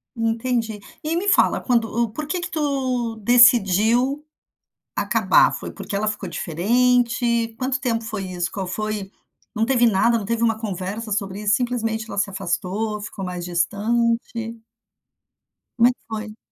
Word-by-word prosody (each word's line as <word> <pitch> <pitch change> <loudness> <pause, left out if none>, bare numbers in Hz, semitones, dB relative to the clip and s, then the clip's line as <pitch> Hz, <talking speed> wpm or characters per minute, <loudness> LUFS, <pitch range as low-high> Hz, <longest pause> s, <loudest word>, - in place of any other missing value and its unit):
Entendi. 225 -1 -1 0.2
E 320 +2 -1
me 385 +4 -1
fala - - +4
quando 235 -3 +2
o 235 +1 -1
por 300 +5 -5
que 350 +3 -2
que - - -4
tu 260 -6 -1
decidiu 240 +4 +4 0.7
acabar? - - +3
Foi - - -6
porque 200 - -6
ela 215 +2 0
ficou 210 0 -3
diferente? 235 +5 +1
Quanto 260 0 -1
tempo 230 -3 -1
foi 215 -3 -4
isso? 175 -1 -3
Qual 190 -2 -4
foi 210 0 -3 0.4
não 220 +1 +1
teve 245 -2 +3
nada, 230 +2 +3
não 205 - -4
teve 230 +1 -1
uma 225 -1 +1
conversa 205 +1 -4
sobre 200 0 -2
isso? 210 +1 +3
Simplesmente 225 -3 -1
ela - - -6
se 200 0 +1
afastou, 200 +3 -2
ficou 205 -1 -7
mais 180 -1 -5
distante? 230 +5 -1 1.2
Como 235 +1 +6
é - - +2
que - - -47
foi? 220 0 -6
225 Hz, 155 wpm, -22 LUFS, 205-240 Hz, 1.2 s, Como